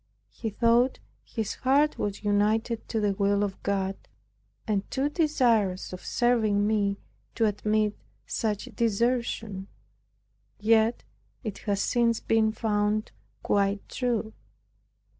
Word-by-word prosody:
He 225 Hz, -, -4 dB
thought 235 Hz, +4 st, +3 dB, 0.3 s
his 220 Hz, -3 st, -3 dB
heart 280 Hz, +4 st, +2 dB
was 205 Hz, 0 st, -3 dB
united 215 Hz, +3 st, +1 dB
to 225 Hz, -, -1 dB
the 205 Hz, -2 st, +1 dB
will 200 Hz, +1 st, +1 dB
of 195 Hz, -2 st, -4 dB
God 195 Hz, -1 st, -1 dB, 0.7 s
and 205 Hz, -2 st, -1 dB
too 275 Hz, +2 st, 0 dB
desirous 235 Hz, -, +1 dB
of 185 Hz, -, -8 dB
serving 220 Hz, -4 st, +2 dB
me, 205 Hz, -2 st, +1 dB, 0.4 s
to 225 Hz, -, +2 dB
admit 210 Hz, 0 st, +1 dB, 0.3 s
such 210 Hz, -2 st, -2 dB
desertion; 225 Hz, -3 st, 0 dB, 0.9 s
yet 220 Hz, +2 st, +3 dB, 0.4 s
it 215 Hz, -4 st, -5 dB
has 200 Hz, -1 st, +1 dB
since 235 Hz, -2 st, +2 dB
been 220 Hz, -1 st, +2 dB
found 215 Hz, -1 st, 0 dB, 0.3 s
quite 200 Hz, 0 st, +1 dB
true. 235 Hz, -4 st, -2 dB
215 Hz, 115 wpm, -27 LUFS, 205-235 Hz, 0.9 s, thought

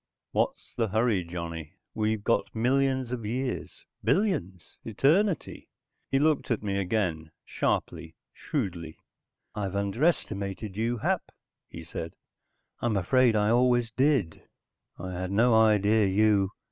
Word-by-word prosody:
"What's -, -, -1 dB
the 115 Hz, -2 st, 0 dB
hurry, 110 Hz, -2 st, +1 dB
Johnny? 85 Hz, -2 st, -6 dB, 0.2 s
We've 110 Hz, -1 st, -1 dB
got 115 Hz, -, 0 dB
millions 130 Hz, +1 st, +1 dB
of 125 Hz, -3 st, -4 dB
years, 125 Hz, +4 st, -4 dB, 0.2 s
billions, 125 Hz, -, -1 dB
eternity." 160 Hz, -, +1 dB, 0.4 s
He 135 Hz, -, +2 dB
looked 150 Hz, +1 st, +1 dB
at 115 Hz, -3 st, -1 dB
me 100 Hz, -1 st, -1 dB
again, 90 Hz, -5 st, -1 dB, 0.2 s
sharply, 80 Hz, +1 st, -2 dB, 0.2 s
shrewdly. 90 Hz, -, -4 dB, 0.6 s
"I've 100 Hz, -2 st, -3 dB
underestimated 100 Hz, -, -1 dB
you, 115 Hz, +3 st, -1 dB
Hap," -, -, -1 dB, 0.4 s
he 85 Hz, -, -9 dB
said. 80 Hz, 0 st, -7 dB, 0.6 s
"I'm 115 Hz, -4 st, 0 dB
afraid 120 Hz, +5 st, +3 dB
I 105 Hz, +1 st, +2 dB
always 120 Hz, -1 st, +3 dB
did. 130 Hz, -, +1 dB, 0.6 s
I 95 Hz, +1 st, -6 dB
had 90 Hz, 0 st, -4 dB
no 115 Hz, +5 st, +3 dB
idea 110 Hz, -1 st, +4 dB
you...." 100 Hz, 0 st, +3 dB
110 Hz, 120 wpm, -28 LUFS, 95-125 Hz, 0.6 s, idea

